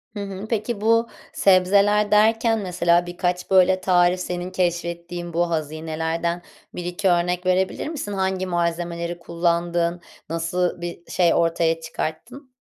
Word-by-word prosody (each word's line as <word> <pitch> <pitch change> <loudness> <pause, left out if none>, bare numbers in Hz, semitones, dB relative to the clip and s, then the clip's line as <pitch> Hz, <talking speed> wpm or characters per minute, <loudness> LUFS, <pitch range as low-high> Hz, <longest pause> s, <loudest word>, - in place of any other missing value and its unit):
Hı - - -4
hı, 195 +1 -7
peki 215 -1 -2
bu 230 +1 +3 0.3
sebzeler 200 +2 +3
derken 225 +1 +3
mesela 175 -2 +2
birkaç, 180 0 -2
böyle, 185 0 +5
tarif 180 0 +3
senin 180 0 -4
keşfettiğin, 175 -1 -3
bu 170 0 +1
hazinelerden 160 +2 -2 0.3
1-2 180 +2 -1
örnek 180 +1 +1
verebilir 185 +7 0
misin? 275 -10 -5
Hangi 190 -1 -1
malzemeleri 170 0 -2
kullandın? 170 0 -1 0.3
Nasıl 170 +2 -1
bir 175 0 -6
şey 175 -2 +3
ortaya 165 -1 +1
çıkarttın? 240 - -6
175 Hz, 125 wpm, -22 LUFS, 170-190 Hz, 0.3 s, böyle